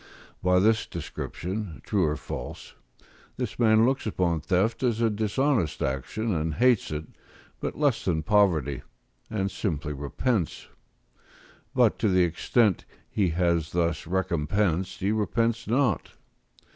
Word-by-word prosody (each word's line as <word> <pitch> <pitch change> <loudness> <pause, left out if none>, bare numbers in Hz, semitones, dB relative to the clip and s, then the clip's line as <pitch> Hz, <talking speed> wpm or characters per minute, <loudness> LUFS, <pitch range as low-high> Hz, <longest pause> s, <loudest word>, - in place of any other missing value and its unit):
By 90 0 +3
this 110 +4 +3
description, 90 +2 -5
true 100 -5 +2
or 75 0 0
false, - - -7 0.6
this - - -4
man 110 -1 +5
looks 135 -2 0
upon 85 -6 0
theft 100 +8 +1
as 120 -4 +1
a 115 -1 +2
dishonest 110 - 0
action, 70 - -2
and 80 -2 -1
hates 125 -2 +3
it, 75 0 -4 0.5
but - - -4
less 145 -5 +1
than 80 -4 0
poverty, 85 -9 +2 0.5
and 100 -3 -1
simply 75 -8 -2
repents; 80 - -2 1.1
but - - +3
to 110 - +2
the 90 -1 +4
extent 95 +5 +2 0.3
he 100 -4 +1
has 85 -1 0
thus 85 -2 0
recompensed 90 +1 0
he 100 +2 +1
repents 115 +2 0
not. 120 - +1
95 Hz, 130 wpm, -27 LUFS, 85-110 Hz, 1.1 s, man